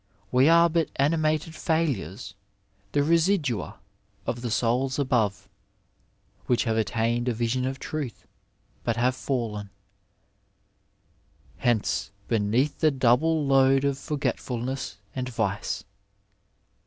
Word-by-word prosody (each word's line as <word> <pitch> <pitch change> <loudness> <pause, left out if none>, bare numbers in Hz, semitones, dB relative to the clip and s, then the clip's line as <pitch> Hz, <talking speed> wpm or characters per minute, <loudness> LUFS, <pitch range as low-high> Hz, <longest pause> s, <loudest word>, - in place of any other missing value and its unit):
We 130 +4 +5
are 170 +1 +7
but 165 -1 0
animated 155 +2 +1
failures 120 - -1 0.3
— 100 0 -39
^the 145 0 +2
residua 165 - +1 0.5
of 120 - -3
the 120 - -3
souls 125 +4 +1
above, 110 -8 0 1.0
which 125 - +2
have 115 -2 0
attained 115 +3 0
a 120 - +1
vision 120 +3 0
of 135 0 -3
truth, 145 -6 -5 0.6
but 115 - 0
have 125 +2 +2
&llen 115 -7 -3 0.9
'' - - -36
hence 120 -4 +1 0.2
beneath 115 +6 +1
the 155 - +5
double 140 +4 +2
load 135 0 +4
of 140 -1 0
forgetful 140 -4 -2
ness 130 -3 -4 0.2
and 130 -1 -3
vice." 105 -2 -2
125 Hz, 115 wpm, -26 LUFS, 115-145 Hz, 1.0 s, are